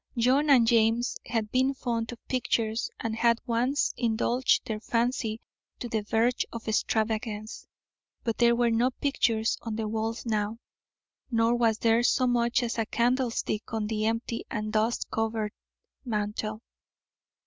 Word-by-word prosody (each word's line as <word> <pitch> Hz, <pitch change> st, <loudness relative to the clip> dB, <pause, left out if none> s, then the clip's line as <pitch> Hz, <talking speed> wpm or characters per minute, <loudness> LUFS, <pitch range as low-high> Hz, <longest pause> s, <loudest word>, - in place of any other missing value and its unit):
John 260 Hz, +6 st, +3 dB
and 255 Hz, -5 st, +6 dB
James 230 Hz, +2 st, +3 dB
had 220 Hz, -2 st, -2 dB
been 260 Hz, +2 st, +2 dB
fond 230 Hz, -3 st, -2 dB
of 240 Hz, -, -12 dB
pictures 230 Hz, -3 st, 0 dB
and 225 Hz, -1 st, -2 dB
had 235 Hz, 0 st, +3 dB
once 250 Hz, +4 st, +1 dB
indulged 240 Hz, +2 st, +1 dB
their 215 Hz, -1 st, -3 dB
fancy 230 Hz, -1 st, -1 dB, 0.4 s
to 245 Hz, -, -5 dB
the 225 Hz, -2 st, -1 dB
verge 225 Hz, +4 st, +1 dB
of 230 Hz, -1 st, -8 dB
extravagance, 220 Hz, 0 st, -1 dB, 0.6 s
but 230 Hz, -3 st, -2 dB
there 235 Hz, 0 st, +5 dB
were 235 Hz, -1 st, +2 dB
no 235 Hz, +3 st, +3 dB
pictures 235 Hz, -4 st, 0 dB
on 225 Hz, -2 st, -4 dB
the 220 Hz, -1 st, -2 dB
walls 225 Hz, +2 st, -3 dB
now, 215 Hz, -1 st, -1 dB, 0.7 s
nor 230 Hz, -1 st, +2 dB
was 230 Hz, -2 st, +2 dB
there 230 Hz, +1 st, +3 dB
so 255 Hz, +1 st, +3 dB
much 240 Hz, 0 st, +2 dB
as 235 Hz, -1 st, -2 dB
a 225 Hz, -, 0 dB
candlestick 240 Hz, -2 st, 0 dB
on 220 Hz, -1 st, -1 dB
the 215 Hz, 0 st, -1 dB
empty 230 Hz, +1 st, -2 dB
and 215 Hz, 0 st, -3 dB
dust 220 Hz, +2 st, +1 dB
covered 220 Hz, -1 st, -1 dB, 0.5 s
mantel. 215 Hz, -1 st, -3 dB
230 Hz, 150 wpm, -28 LUFS, 220-240 Hz, 0.7 s, and